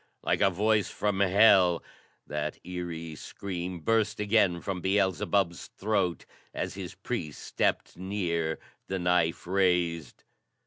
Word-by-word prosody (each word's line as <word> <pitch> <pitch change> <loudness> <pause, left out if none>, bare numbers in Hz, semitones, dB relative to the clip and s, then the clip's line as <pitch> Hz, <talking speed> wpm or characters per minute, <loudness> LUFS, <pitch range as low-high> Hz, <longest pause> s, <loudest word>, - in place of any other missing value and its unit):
Like - - +1
a - - +6
voice 105 +2 +1
from 105 -2 -1
hell, 95 -3 +5 0.4
that 75 0 -3
eery 85 -3 -5
scream 90 +1 -6
burst 110 +2 +1
again 100 -4 +3
from 95 0 -4
Beelzebub's 95 -2 +1
throat 100 -4 -1 0.3
as - - -3
his - - -7
priest 75 -2 -4
stepped - - -1
near, 85 -4 -1 0.3
the 95 - -2
knife 90 -2 +1
raised. 90 -5 0
90 Hz, 120 wpm, -29 LUFS, 85-100 Hz, 0.4 s, a